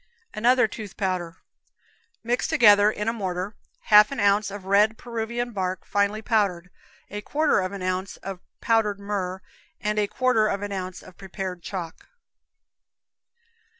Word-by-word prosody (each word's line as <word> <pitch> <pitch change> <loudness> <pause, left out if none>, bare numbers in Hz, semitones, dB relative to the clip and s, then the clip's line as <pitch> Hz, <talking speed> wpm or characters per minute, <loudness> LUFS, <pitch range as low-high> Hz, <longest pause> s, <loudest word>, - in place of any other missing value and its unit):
Another 245 +2 +3
Tooth 210 -2 -9
Powder. 185 -3 -2 0.9
Mix 240 +2 0
together, 210 -9 +6
in 210 0 -4
a 225 - +1
mortar, 190 -2 -3 0.3
half 210 +2 +6
an 275 - -4
ounce 205 0 +3
of 200 -1 -8
red 210 +3 +3
Peruvian 235 +1 -4
bark, 185 -3 -3
finely 205 +2 0
powdered, 190 -6 0 0.4
a 205 +1 -5
quarter 305 +7 +1
of 185 0 -2
an 200 -2 -6
ounce 185 +1 -2
of 195 -2 -7 0.2
powdered 220 -3 +1
myrrh, 190 -2 -3 0.4
and 210 0 -1
a 205 - +1
quarter 250 -2 +2
of 200 -1 -2
an 205 - -4
ounce 185 -2 -5
of 185 - -15
prepared 190 -2 -6
chalk. 175 -3 -7
205 Hz, 150 wpm, -25 LUFS, 185-220 Hz, 0.9 s, together